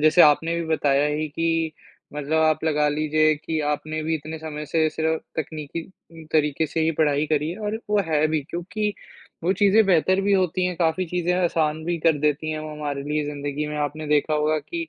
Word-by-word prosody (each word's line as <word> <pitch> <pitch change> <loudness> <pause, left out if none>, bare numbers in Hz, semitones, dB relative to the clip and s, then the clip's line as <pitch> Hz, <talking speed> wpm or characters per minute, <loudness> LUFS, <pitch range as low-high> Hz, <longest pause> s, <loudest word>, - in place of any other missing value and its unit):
जैसे 155 +3 +6
आपने 160 +3 +4
भी - - -3
बताया 145 -3 +2
है 150 +1 -1
कि, 165 +1 0 0.4
मतलब 150 +2 0
आप 155 0 +2
लगा 150 -1 +2
लीजिए 155 +1 +2
कि 160 - -1
आपने 155 +1 -4
भी 160 +1 0
इतने 155 +1 -5
समय 150 -1 -6
से 160 +1 +2
सिर्फ़ 160 +1 0 0.2
तकनीकी 155 +1 -6 0.3
उम, 160 -1 -11
तरीक़े 150 0 +2
से 160 - -2
ही 160 0 +2
पढ़ाई 150 -1 +2
करी 155 +3 0
और 215 0 -3
वो 210 -1 +3
है 155 0 +3
भी, 155 0 0
क्योंकि 205 +5 -2 0.5
वो 185 - +3
चीज़ें 205 +3 +4
बेहतर 185 +1 +3
भी 200 +1 +1
होती 185 -1 +2
हैं, 180 - -3
काफ़ी 170 +2 +1
चीज़ें 180 +1 0
आसान 160 -2 0
भी 170 0 -1
कर 160 -2 +4
देती 150 +1 0
हैं 155 - -3
वो 155 0 -6
हमारे 145 -2 -4
लिए 150 +1 -1
ज़िंदगी 145 0 -3
में। 150 - -4
आपने 150 +1 -3
देखा 150 +1 +2
होगा 150 +1 +1
कि, 335 - -5
155 Hz, 205 wpm, -24 LUFS, 150-165 Hz, 0.5 s, जैसे